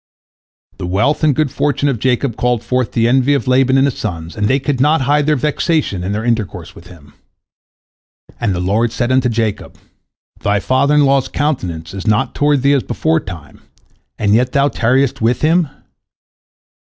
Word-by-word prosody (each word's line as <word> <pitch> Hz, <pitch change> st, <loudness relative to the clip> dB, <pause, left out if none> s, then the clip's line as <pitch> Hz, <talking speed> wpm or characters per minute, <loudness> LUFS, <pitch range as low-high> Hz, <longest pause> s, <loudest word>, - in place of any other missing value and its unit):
The 90 Hz, -, -4 dB
wealth 105 Hz, -, 0 dB
and 150 Hz, -3 st, +3 dB
good 155 Hz, -3 st, 0 dB
fortune 145 Hz, 0 st, 0 dB
of 130 Hz, -5 st, -1 dB
Jacob 125 Hz, 0 st, 0 dB
called 120 Hz, -1 st, -1 dB
forth 125 Hz, -1 st, -1 dB
the 115 Hz, 0 st, +2 dB
envy 130 Hz, +3 st, +3 dB
of 135 Hz, -, -3 dB
Laban 130 Hz, +1 st, +3 dB
and 135 Hz, -, +4 dB
his 140 Hz, -, -2 dB
sons, 85 Hz, -5 st, -5 dB
and 105 Hz, -1 st, 0 dB
they 130 Hz, -, +2 dB
could 140 Hz, -1 st, -2 dB
not 150 Hz, +1 st, +3 dB
hide 145 Hz, +2 st, +1 dB
their 155 Hz, -, +3 dB
vexation 150 Hz, -, -1 dB
in 95 Hz, -, -3 dB
their 105 Hz, +2 st, -3 dB
intercourse 115 Hz, -5 st, -3 dB
with -, -, -15 dB
him. 75 Hz, -5 st, -16 dB, 1.3 s
And 105 Hz, -6 st, -1 dB
the -, -, -3 dB
Lord 105 Hz, +6 st, 0 dB
said 120 Hz, +3 st, -2 dB
unto 130 Hz, -1 st, +2 dB
Jacob, 110 Hz, -3 st, -3 dB, 0.6 s
"Thy 100 Hz, 0 st, 0 dB
father 130 Hz, +7 st, +1 dB
in 145 Hz, -1 st, +4 dB
law's 135 Hz, -1 st, +2 dB
countenance 90 Hz, -, -3 dB
is 100 Hz, +2 st, -7 dB
not 110 Hz, +4 st, +1 dB
toward 145 Hz, -2 st, +1 dB
thee 140 Hz, +1 st, +4 dB
as 140 Hz, -, +2 dB
beforetime, 95 Hz, -, -3 dB, 0.6 s
and 105 Hz, -1 st, +1 dB
yet 125 Hz, +3 st, +2 dB
thou 140 Hz, +1 st, +3 dB
tarriest 130 Hz, +2 st, 0 dB
with 115 Hz, +2 st, +1 dB
him? 165 Hz, 0 st, +2 dB
125 Hz, 180 wpm, -16 LUFS, 105-140 Hz, 1.3 s, and